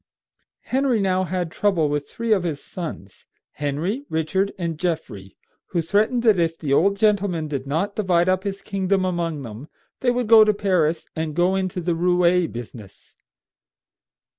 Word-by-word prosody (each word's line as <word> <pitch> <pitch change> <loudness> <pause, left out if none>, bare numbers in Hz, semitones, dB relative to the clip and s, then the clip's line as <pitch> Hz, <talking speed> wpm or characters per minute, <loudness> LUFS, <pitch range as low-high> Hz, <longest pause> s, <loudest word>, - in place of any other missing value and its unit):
Henry 260 -3 +1
now 185 -1 +1
had 175 -1 -3
trouble 185 -6 +1
with 145 0 -2
three 230 -1 0
of 195 - +2
his 160 -5 -3
sons, 155 - -8 0.2
Henry, 155 - -3
Richard, 160 +5 0
and 165 -4 -3
Geoffrey, 130 - -4 0.3
who 170 - -2
threatened 215 +8 +1
that 215 -6 +4
if 165 -1 0
the 145 -4 -2
old 200 +7 +3
gentleman 200 -6 +1
did 140 -2 -4
not 175 +8 -1
divide 180 -4 +2
up 185 0 +1
his 200 -1 -4
kingdom 195 -1 0
among 170 -5 -2
them 115 +4 -9 0.3
they 255 - +1
would 245 0 0
go 220 0 +8
to 210 -1 +2
Paris 180 -6 +1
and 160 -2 -3
go 180 +2 +2
into 185 -1 -2
the 175 0 -1
roué 175 0 +2
business. 115 -4 -10
180 Hz, 165 wpm, -22 LUFS, 160-200 Hz, 0.3 s, go